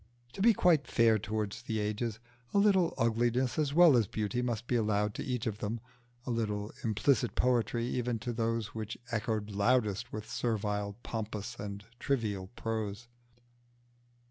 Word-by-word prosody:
To - - -5
be 230 +3 +7
quite 165 -6 +4
fair 115 -2 +4
towards 110 +1 -3
the 115 -2 -3
ages, 105 +1 -2 0.4
a - - +5
little 195 -4 +4
ugliness 120 +3 +1
as 145 -2 +1
well 165 -2 +7
as 115 -4 +3
beauty 110 +5 -2
must 120 -2 -2
be 125 - 0
allowed 105 -2 +1
to - - -4
each 125 -2 -2
of 110 -2 -2
them, 110 +2 -2 0.5
a 125 - -2
little 105 -2 -1
implicit 115 +2 +2
poetry 120 -2 +2
even 125 -1 -1
to 120 +2 -4
those 115 -2 -1
which 110 0 -5
echoed 110 -2 -1
loudest 105 0 +1
with 110 0 -6
servile, 105 -4 -1
pompous, 110 -2 -4
and 100 0 -6
trivial 110 -9 -1
prose. 110 0 -3
115 Hz, 155 wpm, -32 LUFS, 105-120 Hz, 0.5 s, be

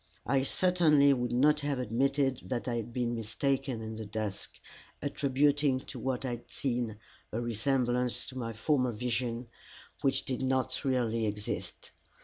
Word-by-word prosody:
I 135 +2 +3
certainly 150 -2 +4
would 125 -2 -1
not 150 +5 +4
have 145 -2 -1
admitted 130 +3 +1
that 125 0 -3
I 120 -1 0
had 115 0 -4
been 120 0 -1
mistaken 125 +2 -1
in 110 0 -5
the 110 - -5
dusk, 105 -2 -4 0.4
attributing 145 0 +2
to - - -8
what 130 0 -2
I - - -1
had 120 0 -7
seen 120 -5 -2 0.3
a 110 - -1
resemblance 120 +1 0
to 130 - -10
my 115 -2 -3
former 125 +2 +1
vision 120 +1 -2 0.5
which 135 - +2
did 130 -1 -2
not 130 0 0
really 115 -4 +1
exist. 105 0 -4
125 Hz, 150 wpm, -31 LUFS, 115-135 Hz, 0.5 s, certainly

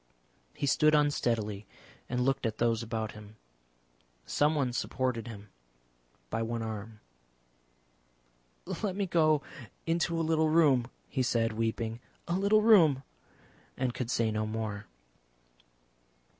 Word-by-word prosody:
He - - -2
stood 155 +2 +4
unsteadily 115 -8 0 0.4
and 125 0 -1
looked 135 -3 +1
at 110 - -4
those 115 -1 +1
about 110 -1 -3
him. 105 0 -12 0.9
Someone 145 -4 +1
supported 125 -2 -2
him 105 -3 -9 0.8
by 115 - -1
one 115 0 -2
arm. 110 0 -6 1.8
"Let 195 -4 -1
me 200 0 0
go 155 -4 +3 0.4
into 165 0 0
a 165 - 0
little 160 -1 +2
room," 145 -7 +4 0.2
he 130 - -1
said, 115 -3 +1
weeping; 115 +1 -2 0.3
"a 170 - -1
little 200 +3 +3
room," 165 - +6 0.7
and 125 -2 -1
could 120 -2 -4
say 115 -2 +1
no 110 0 -1
more. 110 -2 -4
125 Hz, 120 wpm, -30 LUFS, 110-155 Hz, 1.8 s, room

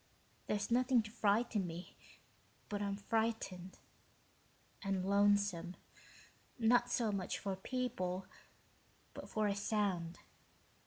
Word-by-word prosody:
There's 205 +1 -1
nothing 250 -1 +4
to 215 - -9
frighten 210 -2 +2
me, 170 +2 -7 0.7
but 205 0 -2
I - - 0
am 200 - -1
frightened... 205 -4 -1 1.0
and 195 -2 -1
lonesome, 200 -3 +3 0.8
not 240 +1 +4
so 230 -3 +1
much 195 -3 -2
for 195 -1 -3
people, 190 -5 -2 0.9
but - - -8
for 215 -1 0
a 200 -1 +1
sound 200 -5 0
205 Hz, 110 wpm, -37 LUFS, 190-225 Hz, 1.0 s, nothing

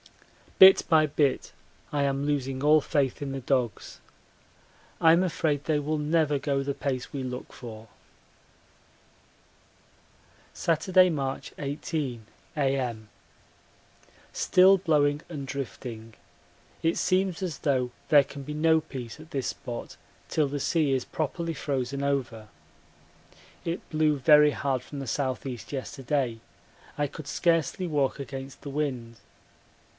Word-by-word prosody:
Bit 190 0 +9
by 160 -2 +5
bit 145 -2 0 0.4
I 145 -1 +1
am 140 0 0
losing 135 -2 -1
all 155 +1 +6
faith 140 -3 0
in 140 -1 -3
the 135 - -3
dogs 125 -3 -2 1.0
I'm 165 +2 +5
afraid 155 -5 0
they 155 -2 +1
will 155 +2 -1
never 150 -1 +2
go 140 -1 0
the 140 0 -2
pace 130 -3 -3
we 135 -2 -3
look 125 0 -6
for. 115 -3 -10 2.7
Saturday, 180 +3 +3
March 135 -5 -3
18, 140 -4 -3 0.3
A.M. 130 -6 -1 1.2
Still 190 +2 +5
blowing 150 -4 +2
and 145 -5 -6
drifting. 115 -4 -6 0.7
It 165 +1 +2
seems 185 -1 +1
as 170 -7 -4
though 130 -5 0 0.2
there 145 -3 +7
can 140 +1 -9
be 150 - -6
no 160 +1 +3
peace 125 -5 -8
at 155 +2 -14
this 135 -5 -2
spot 120 -1 -6 0.3
till 155 -2 +1
the 145 +1 -3
sea 150 -1 +1
is 130 -2 -1
properly 165 +2 -3
frozen 140 -2 -3
over. 125 -6 -2 1.2
It 170 +1 -4
blew 155 -1 +2
very 150 +1 +6
hard 135 -3 -1
from 145 - -8
the 135 -3 -5
S.E. 130 -2 -2
yesterday 135 -3 -2 0.6
I 145 - +1
could 145 +1 -10
scarcely 170 +1 +1
walk 145 -3 0
against 135 -1 -7
the 140 - -7
wind. 130 -6 -3
140 Hz, 130 wpm, -27 LUFS, 130-155 Hz, 2.7 s, Bit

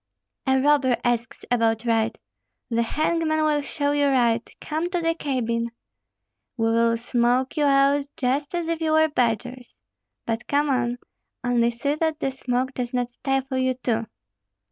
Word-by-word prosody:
"A 265 0 +4
robber 270 -3 +3
asks 235 -2 -1
about 225 -1 +2
right! 225 -1 +1 0.5
The 230 0 +2
hangman 310 +5 0
will 300 -1 +2
show 285 0 -1
you 290 0 +2
right! 240 -4 +2
Come 320 +3 -2
to 355 -1 -1
the 330 -1 +1
cabin." 235 -7 -1 0.9
"We 225 -1 +1
will 230 0 +3
smoke 245 +2 +1
you 300 -2 +2
out 280 0 +3
just 280 +5 -1
as 345 -2 -2
if 335 -1 -2
you 315 -1 +1
were 315 0 +4
badgers." 245 -1 -2 0.5
"But 230 +1 -3
come 290 0 +2
on; 245 -2 0 0.5
only 240 -1 +2
see 245 +5 -1
that 315 0 -1
the 270 - -1
smoke 260 0 -2
does 250 0 -4
not 245 0 -1
stifle 270 +1 -1
you 260 0 +1
too." 230 -3 -1
260 Hz, 160 wpm, -24 LUFS, 235-290 Hz, 0.9 s, A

